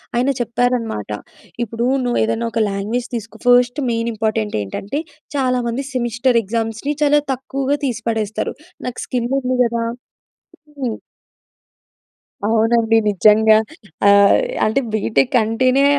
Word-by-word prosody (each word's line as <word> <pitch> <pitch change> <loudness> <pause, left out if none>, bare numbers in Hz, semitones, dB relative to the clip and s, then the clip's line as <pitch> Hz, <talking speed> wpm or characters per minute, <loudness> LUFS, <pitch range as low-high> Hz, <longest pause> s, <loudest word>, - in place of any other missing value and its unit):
ఆయన 250 +3 +2
చెప్పారన్నమాట 235 - -1 0.5
"ఇప్పుడు 230 +2 -2 0.2
నువ్వు 245 -1 0
ఏదైనా 225 +1 -1
ఒక 230 - -1
లాంగ్వేజ్ 215 +5 -2
తీసుకో" 225 -1 -7
ఫస్ట్ 245 +3 +4
మెయిన్ 230 0 -1
ఇంపార్టెంట్ 215 -1 -1
ఏంటంటే 195 - -4 0.4
చాలామంది 250 -1 0
సెమిస్టర్ 240 0 +1
ఎగ్జామ్స్‌ని 225 +6 -2
చాలా 295 0 +4
తక్కువగా 270 +2 -2
తీసిపడేస్తారు 225 -3 -2 0.3
నాకు 250 - -5
స్కిల్ 245 -1 -2
ఉంది 255 0 -1
కదా 235 0 -1 1.0
హ్మ్. 245 -5 -2 1.5
అవునండి 225 0 +3
నిజంగా. 215 +2 +5 0.5
ఆహ్, 200 0 +6 0.3
అంటే 220 +5 +2
బీటెక్ 225 +5 +1
అంటేనే 255 +5 +2
235 Hz, 110 wpm, -19 LUFS, 220-250 Hz, 1.5 s, ఆహ్